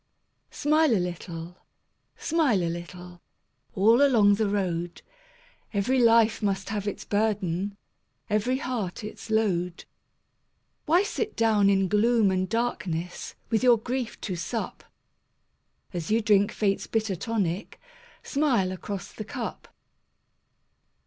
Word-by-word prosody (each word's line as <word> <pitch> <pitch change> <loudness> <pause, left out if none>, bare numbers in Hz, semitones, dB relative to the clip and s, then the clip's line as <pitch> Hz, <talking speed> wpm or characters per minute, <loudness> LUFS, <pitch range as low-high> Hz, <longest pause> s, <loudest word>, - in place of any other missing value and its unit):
Smile 305 -2 +2
a - - +3
little, 175 -1 -5 0.6
smile 295 - +1
a 165 - 0
little, 175 +1 -9 0.5
All 225 +7 +5
along 225 -8 +5
the 205 0 +1
road; 175 -4 -2 0.7
Every 250 +7 +2
life 230 -2 +4
must 195 -2 -1
have 205 -1 -3
its 205 - -4
burden, 200 -2 -1 0.5
Every 225 +4 +1
heart 225 -7 -4
its 210 - -8
load. 180 -6 0 1.0
Why 345 +5 +4
sit 425 +1 -3
down 215 -3 +3
in 195 -1 +3
gloom 215 +1 +3
and 185 0 -1
darkness 180 -7 -3 0.2
With 220 - +2
your 245 -2 +6
grief 245 +1 -4
to 190 - -3
sup? 175 +7 -4 1.1
As 170 -3 -4
you 220 +2 +3
drink 205 -2 +3
Fate's 200 -2 0
bitter 220 -3 -1
tonic, 195 -1 -2 0.4
Smile 260 -11 +1
across 190 +1 -6
the 215 - -6
cup. 215 - -6
205 Hz, 120 wpm, -26 LUFS, 185-230 Hz, 1.1 s, your